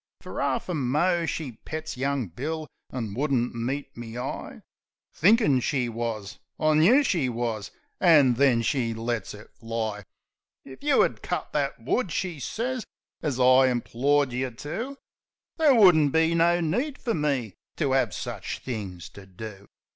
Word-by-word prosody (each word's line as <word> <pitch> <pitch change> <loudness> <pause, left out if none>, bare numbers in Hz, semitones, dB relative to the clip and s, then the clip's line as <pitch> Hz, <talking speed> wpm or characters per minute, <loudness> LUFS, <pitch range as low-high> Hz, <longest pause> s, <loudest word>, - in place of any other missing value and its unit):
Fer - - -6
'arf - - -1
a 180 - -2
mo 165 +5 +1
she 155 -6 -3
pets 155 0 -5
young 135 0 -1
Bill, 150 - -4 0.3
an' 115 -6 -4
would'nt 130 -1 0
meet 135 +4 -4
me 120 0 -8
eye. 125 +2 -6 0.5
Thinkin' 200 - +4
she 125 -1 0
wus 110 -3 -4 0.2
I 155 0 +3
knew 200 - +5
she 165 - +1
wus. 115 -3 -3 0.3
An' 150 -8 +6
then 120 -2 +3
she 115 -2 0
lets 115 -3 -3
it 105 - -14
fly: 110 -2 -4 0.6
"If 130 - -12
you 295 - +4
'ad - - -2
cut - - -4
that - - -1
wood," 220 -9 -1
she 175 -2 -2
sez, 245 - -3 0.4
"an 140 -5 -2
I 130 +1 +6
implored 130 +3 +1
you 130 +1 -1
to, 220 - -6 0.6
There 305 -5 +5
wouldn't 170 - +6
be 160 +1 +3
no 170 +1 +3
need 245 - -1
fer 230 - -2
me 140 - -1 0.2
to 140 -5 +1
'ave 135 - +2
sich - - -5
things 100 -8 -5
to 100 -1 -13
do! 100 +1 -9
135 Hz, 155 wpm, -26 LUFS, 115-160 Hz, 0.6 s, An